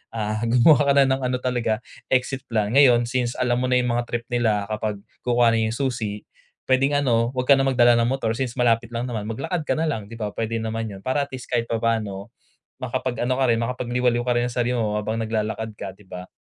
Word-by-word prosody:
ah, 110 -1 -2
gumawa 125 +4 +5
ka 140 - +5
na 140 - +6
ng 130 0 +1
ano 125 0 0
talaga 120 -3 -1 0.2
exit 130 +1 -1
plan, 110 -3 0
ngayon, 125 -3 +5
since 120 0 -2
alam 125 -1 0
mo 130 - 0
na 125 - +2
'yung 125 -1 +2
mga 120 0 -1
trip 120 -1 -3
nila 110 -4 +1
kapag 105 -2 -3 0.2
kukuhanin 120 -2 +2
'yung 110 - -3
susi 115 -6 -3 0.4
puwedeng 135 +2 +2
ano 120 -1 +1
huwag 125 - 0
ka 140 -1 +6
na 135 - +2
magdala 120 -2 +5
ng 115 - +2
motor 130 -3 -1
since 120 +1 -3
malapit 115 -2 +2
lang 115 - -1
naman, 115 -4 -4
maglakad 145 +8 -3
ka - - +1
na 160 - -1
lang 115 -11 -2
'di 115 - -10
ba 105 -2 -4
puwede 115 +1 -3
naman 115 0 -3
'yun, 100 -2 -9
para 140 +4 0
at - - -33
least 130 - -11
kahit 120 -2 0
papaano 110 -4 -2 0.5
makapag-ano 125 0 -2
ka 135 +1 +1
rin, 115 - +2
makapagliwaliw 120 0 0
ka 120 0 +1
rin 120 - +1
ng 120 - -6
sarili 120 0 0
mo 105 -2 -1
habang 110 +1 -2
naglalakad 110 0 -3
ka 100 - -6
'di 105 - -19
ba? 90 0 -9
120 Hz, 225 wpm, -23 LUFS, 110-125 Hz, 0.5 s, na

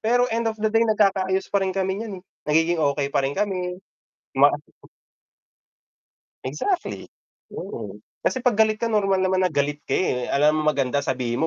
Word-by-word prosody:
pero 245 +2 +3
end 230 0 0
of 220 - -3
the 220 0 0
day, 225 - +4
nagkakaayos 195 -3 +2
pa 200 - +3
rin 190 - 0
kami 190 +1 -1
n'yan 220 -4 -5
eh, - - -30 0.3
nagiging 165 +2 +3
okay 140 -1 +1
pa - - +3
rin 135 - 0
kami, 185 -3 -1 0.6
'di - - -12
ba. - - +7 1.9
Exactly. 380 -3 -2 0.5
Oo, - - -7 0.2
kasi 260 - +1
'pag 245 -4 +2
galit 215 -1 +3
ka 230 - 0
normal 195 -3 +2
naman 185 0 +2
na 180 - -3
galit 145 0 0
ka - - -1
eh, 125 -9 0
alangan 150 +2 +3
maganda 140 -2 +1
sabihin 125 +2 -1
190 Hz, 175 wpm, -23 LUFS, 150-215 Hz, 1.9 s, ba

